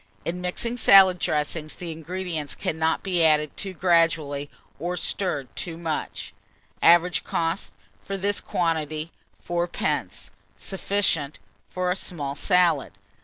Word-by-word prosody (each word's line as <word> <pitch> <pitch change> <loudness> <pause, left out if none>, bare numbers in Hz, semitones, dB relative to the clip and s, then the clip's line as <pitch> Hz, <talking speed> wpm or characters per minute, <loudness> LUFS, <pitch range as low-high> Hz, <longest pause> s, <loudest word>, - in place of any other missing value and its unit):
In 175 +2 -3
mixing 230 +7 -1
salad 190 -5 +7
dressings, 155 0 -2
the 175 -2 -6
ingredients 160 -2 -4
cannot 160 +1 -1
be 180 -3 +1
added 150 -2 +3
too 195 -2 -4
gradually, 165 -5 +2 0.3
or 175 +3 -3
stirred 170 -9 -1
too 165 -2 -4
much. 165 -2 -4 0.5
Average 175 +1 +5
cost, 165 - -2 0.3
for 195 - -4
this 200 +1 0
quantity, 160 -1 -1 0.4
3d. 150 - -2 0.3
Sufficient 190 -7 -1 0.3
for 180 0 -1
a - - +1
small 150 -8 -3
salad. 170 - +2
165 Hz, 120 wpm, -25 LUFS, 155-180 Hz, 0.5 s, salad